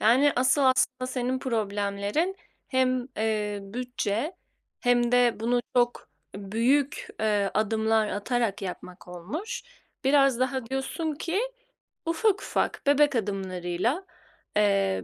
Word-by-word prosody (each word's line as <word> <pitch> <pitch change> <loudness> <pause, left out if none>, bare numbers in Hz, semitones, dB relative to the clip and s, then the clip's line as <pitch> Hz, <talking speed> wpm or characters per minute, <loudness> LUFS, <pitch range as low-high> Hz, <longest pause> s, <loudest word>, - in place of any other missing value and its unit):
Yani, 260 +6 +5
asıl 260 +3 +3
aslında 255 -1 +2
senin 255 0 -1
problemlerin 210 - -1 0.3
hem, 255 -1 +1
eee, 210 -2 -1
bütçe 245 - -3 0.4
hem 245 -1 +2
de 245 -1 +4
bunu 240 +2 +2 0.2
çok 240 -9 +1 0.3
büyük, 235 +8 0
eee, 205 -2 +2
adımlar 220 0 +2
atarak 205 -1 -1
yapmak 180 -1 -7
olmuş. 205 - -5 0.4
Biraz 275 -2 +4
daha 260 -2 0
diyorsun 270 +5 -2
ki 335 +6 -1 0.7
ufak 395 +4 +2
ufak - - -1
bebek 290 -1 +4
adımlarıyla, 195 - -1 0.5
eee, 195 -2 +2
240 Hz, 110 wpm, -27 LUFS, 205-265 Hz, 0.7 s, Yani